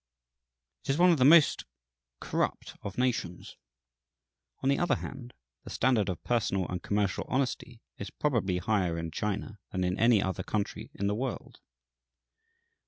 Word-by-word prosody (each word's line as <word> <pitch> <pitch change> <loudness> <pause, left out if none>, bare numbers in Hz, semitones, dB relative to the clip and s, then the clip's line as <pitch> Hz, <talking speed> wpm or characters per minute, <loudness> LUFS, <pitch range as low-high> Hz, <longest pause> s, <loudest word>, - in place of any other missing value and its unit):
It - - -11
is 135 - +2
one 180 +1 +6
of 165 - +2
the 130 - +5
most 155 +1 +6 0.5
corrupt - - -2
of 100 - -7
nations; 120 -9 -2 1.1
on 135 - +2
the 140 - +2
other 175 - +2
hand, 130 -3 -8 0.3
the - - -10
standard 115 -5 +1
of 90 - -5
personal 100 -6 0
and 90 -1 -3
commercial 100 0 0
honesty 130 -2 -2 0.2
is 100 - -5
probably 110 -11 0
higher 90 -4 0
in 85 0 -4
China 105 +3 -3
than 95 -1 -1
in 90 +1 -1
any 115 -1 +5
other 95 -1 -2
country 105 +1 -3
in 100 - -3
the 100 - +1
world. 125 +3 -5
105 Hz, 155 wpm, -29 LUFS, 95-130 Hz, 1.1 s, one